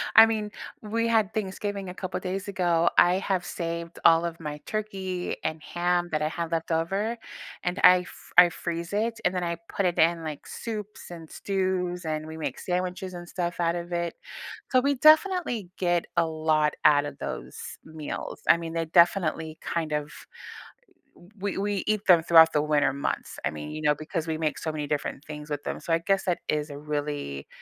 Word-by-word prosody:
I 225 - +11
mean, 215 -2 -1 0.3
we 230 +2 -1
had 220 -2 +2
Thanksgiving 200 -1 -3
a - - -6
couple 185 0 -4
days 190 +2 -4
ago. 175 -4 +2
I 175 +1 +6
have 190 -2 -1
saved 170 -1 -5
all 165 +1 +6
of 165 -1 -4
my 150 -2 -5
turkey 190 -4 -3
and 155 -1 -2
ham 175 +1 0
that 155 -1 0
I 155 - +1
had 170 0 -4
left 165 0 -2
over, 195 +8 0 0.5
and 180 +2 -2
I 180 0 +8
fr - - -14
I 175 -1 +8
freeze 170 0 -4
it 225 +2 0
and 180 +1 +1
then 180 - -1
I 170 -1 -2
put 200 - -1
it 175 - 0
in, 165 0 +3
like, 155 -2 -6
soups 210 -5 -6
and 165 -2 -9
stews, 185 -2 -1
and 155 -1 -2
we 160 0 -8
make 160 - -4
sandwiches 180 +1 -3
and 175 -1 -8
stuff 175 -1 -3
out 170 0 +1
of 175 0 -5
it. 170 -1 -2 0.6
So 255 - +5
we 280 +1 +2
definitely 310 - +4
get 175 -2 +1
a - - +4
lot 155 -1 +1
out 145 -1 +6
of 145 - -7
those - - -6 0.3
meals. 155 -2 -6
I - - +8
mean, 165 -1 -6
they 165 0 -1
definitely 165 -2 +2
kind 165 -2 -2
of 150 0 -2 1.3
w 195 0 -2
we 200 -1 -1
eat 215 -1 0
them 170 -3 +7
throughout 165 -1 +7
the 150 - +3
winter 150 -3 +2
months. 140 - -3
I - - +1
mean, 75 0 -7
you 155 - -5
know, 150 0 +4
because 155 +3 -4
we 160 -1 -2
make 155 -2 -1
so 160 - -3
many 150 -1 -3
different 145 -1 -3
things 150 0 -8
with 145 -1 -3
them. - - -3
So 165 - -3
I 165 - +4
guess 195 +3 +1
that 180 -2 0
is 150 0 -1
a 145 - -7
really 145 - -4
170 Hz, 200 wpm, -27 LUFS, 155-190 Hz, 1.3 s, I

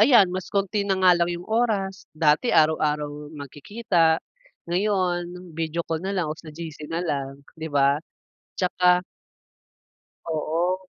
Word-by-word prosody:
ayan, 215 -6 +6
mas 185 0 -4
konti 200 +1 0
na 195 - +2
nga 185 -1 +6
lang 170 0 +2
yung 175 0 -4
oras 205 -4 -1
dati 155 +8 +3
araw-araw 150 -1 +1
magkikita 160 - +1 0.6
ngayon 180 -2 -1
video 165 +1 -2
call 160 -1 -2
na 195 +3 -3
lang 180 - +1
o 155 - -4
sa 160 - -12
GC 155 -1 -8
nalang 145 -5 -2 0.2
di 160 0 -6
ba? 140 0 +3 0.6
'Tsaka 180 -1 +3 1.2
Oo. 165 +3 -1
175 Hz, 130 wpm, -24 LUFS, 155-185 Hz, 1.2 s, ayan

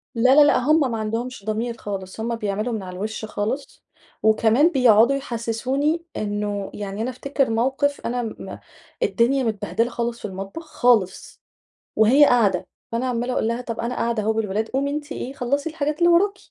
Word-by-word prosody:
لا 255 +4 +4
لا 300 - +8
لأ، 290 - +4
هم 285 0 +2
ما 225 - -2
عندهمش 225 +1 -4
ضمير 230 +2 -2
خالص، 195 -1 -6
هم 230 +1 -2
بيعملوا 215 +2 -2
من 215 -3 -3
على 180 -1 -8
الوش 215 +3 -4
خالص. 220 +6 -4 0.4
وكمان 225 +7 +4
بيقعدوا 245 -1 +5
يحسسوني 270 +6 -1
إنه 205 -1 -3
يعني 205 0 -5
أنا 235 - -1
افتكر 270 +1 -1
موقف 265 +5 0
أنا 245 +1 -1
م 225 - -7 0.5
الدنيا 260 - +2
متبهدلة 225 +1 -1
خالص 235 -1 -3
في - - -8
المطبخ، 195 - -7
خالص، 225 -7 +1 0.5
وهي 255 +7 +6
قاعدة، 200 -8 +2 0.2
فأنا 235 +3 -1
عمَّالة 245 0 -1
أقول 220 - 0
لها: 235 +2 -1
"طب 230 -2 -6
أنا 240 +2 -2
قاعدة 230 -2 -1
أهو 220 +1 +1
بالولاد، 220 0 -2
قومي 275 +2 -1
أنتِ 300 +1 -5
إيه، 265 -2 -5
خلَّصي 280 +5 -1
الحاجات 300 -1 -2
اللي 345 - +5
وراكِ." 395 +4 +3
235 Hz, 175 wpm, -22 LUFS, 215-270 Hz, 0.5 s, لا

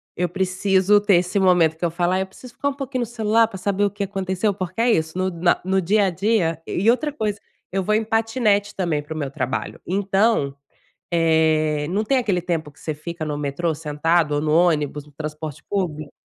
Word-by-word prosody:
eu 180 0 -1
preciso 190 +2 +2
ter 205 -2 +4
esse 180 +3 +1
momento 175 -4 +4
que 175 - -2
eu 170 - 0
falo: 175 +1 0
"Ai, 190 - +1
eu 190 - -3
preciso 240 +5 -14
ficar 280 - -1
um 280 - -4
pouquinho 270 -2 -4
no 240 - 0
celular 225 -1 +2
pra 200 - -8
saber 200 +1 0
o 200 - 0
que 205 0 -4
aconteceu.", 195 +1 -1
porque 185 +3 -4
é 240 - +4
isso, 160 -3 0
no 185 0 +1
na 175 0 +1
no 190 0 +2
dia 200 +3 +3
a - - +2
dia 175 -3 0
e 200 +6 +1
outra 295 +5 -1
coisa, 215 -6 -2 0.3
eu 190 0 -1
vou 215 +3 +1
em 220 - +1
patinete 220 -2 +1
também 170 -6 0
pro 150 +2 -8
meu 145 -3 -3
trabalho. 130 -3 -3
Então, 195 -5 +1 0.6
eh, 160 -2 +2
não 200 +4 0
tem 265 +4 +2
aquele 205 -8 0
tempo 165 -4 -3
que 150 - -24
você 155 - -3
fica 165 +2 -6
no 150 -1 -3
metrô 150 +3 -1
sentado 150 +1 +1
ou 145 - 0
no 155 0 0
ônibus, 150 -3 +2
no 150 - -18
transporte 150 0 -6
público? 155 -7 -2
180 Hz, 220 wpm, -22 LUFS, 160-205 Hz, 0.6 s, ter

